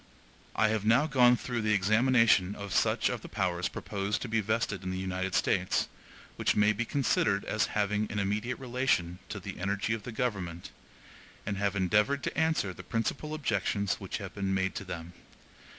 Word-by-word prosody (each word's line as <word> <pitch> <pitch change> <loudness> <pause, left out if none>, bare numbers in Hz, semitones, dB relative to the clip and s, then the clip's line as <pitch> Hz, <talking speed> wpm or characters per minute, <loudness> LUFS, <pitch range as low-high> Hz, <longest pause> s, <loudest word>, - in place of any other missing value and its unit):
(I 110 - +3
have 110 -2 0
now 115 +7 +4
gone 125 -4 +5
through 120 -1 -3
the 105 -1 +2
examination 110 -1 +4
of 100 -2 -6
such - - +2
of - - -2
the - - -10
powers 90 -3 -1
proposed 100 0 -3
to - - -4
be 115 -1 +1
vested 110 -2 -1
in 95 - -4
the 95 - -3
United 95 0 -2
States, 95 -2 +1 0.5
which - - +1
may 105 0 +4
be 120 - -2
considered 110 -6 +1
as 110 - 0
having 105 +1 0
an 105 - -3
immediate 105 +5 -1
relation 125 -9 0
to 100 - -5
the 95 -1 -7
energy 100 +3 -1
of 110 - -3
the 125 - -7
government; 95 -8 -3 0.7
and 100 -1 -2
have 100 -1 0
endeavored 105 +9 +2
to - - -3
answer 160 - +1
the 90 - -10
principal 125 - -2
objections 100 - 0
which - - -4
have - - -7
been 95 -1 -1
made 95 0 0
to - - -5
them. 85 -2 -7
105 Hz, 185 wpm, -30 LUFS, 95-115 Hz, 0.7 s, gone